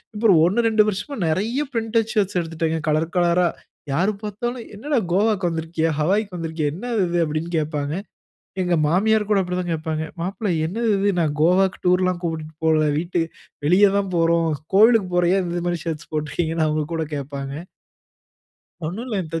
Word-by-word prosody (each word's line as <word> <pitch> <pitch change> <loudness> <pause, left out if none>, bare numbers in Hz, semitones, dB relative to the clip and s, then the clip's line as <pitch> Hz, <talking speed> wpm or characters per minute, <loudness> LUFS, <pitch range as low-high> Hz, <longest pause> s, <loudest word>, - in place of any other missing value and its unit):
இப்போ 220 +1 +2 0.2
ஒண்ணு, 230 +6 +2
ரெண்டு 220 -1 +4
வருஷமா 210 +8 -3
நிறைய 215 - 0
பிரிண்டட் 225 -1 0
ஷர்ட்ஸ் 195 -4 +1
எடுத்துட்டேன் 165 -1 -2
கலர் 160 +2 0
கலரா 175 0 +3 0.5
யாரு 185 +9 +2
பார்த்தாலும், 235 +4 -4
"என்னடா 280 +7 -1 0.2
கோவாக்கு 200 -2 +2
வந்திருக்கியா? 165 0 -1
ஹவாயக்கு 195 +4 +1
வந்திருக்கியா? 160 -2 -2
என்னது 230 +3 -2
இது?" 175 0 -1
அப்படின்னு 155 +2 -3
கேட்பாங்க. 150 -1 -2 0.7
எங்க 180 -1 +1
மாமியார் 210 +7 +3
கூட 205 -2 +4
அப்படித்தான் 180 -1 -2
கேட்பாங்க. 155 0 -2 0.2
மாப்பிள்ள, 195 +3 -2 0.2
என்னது 225 +8 -2
இது? 200 +1 +2
நான் 155 -3 +1
கோவாக்கு 185 +3 +3
டூர்ல்லாம் 180 0 +2
கூட்பிட்டு 160 -2 -4
போல. 155 -1 +3
வீட்டு 175 +1 -2 0.5
வெளியே 190 +6 +5
தான் 195 -2 -1
போறோம். 165 0 +3 0.3
கோவிலுக்கு 220 -2 +5
போறோம். 175 0 +3
ஏன் 185 - 0
இந்த 175 0 -2
மாரி 175 -1 -1
ஷர்ட்ஸ் 165 0 -4
போட்ருக்கிங்கன்னு 160 +1 -1
அவங்க 155 0 0
கூட 160 - -1
கேட்பாங்க. 140 -1 -5 1.3
ஒண்ணு 180 +8 -4
இல்லத்த 170 -8 -3
175 Hz, 155 wpm, -22 LUFS, 160-205 Hz, 1.3 s, வெளியே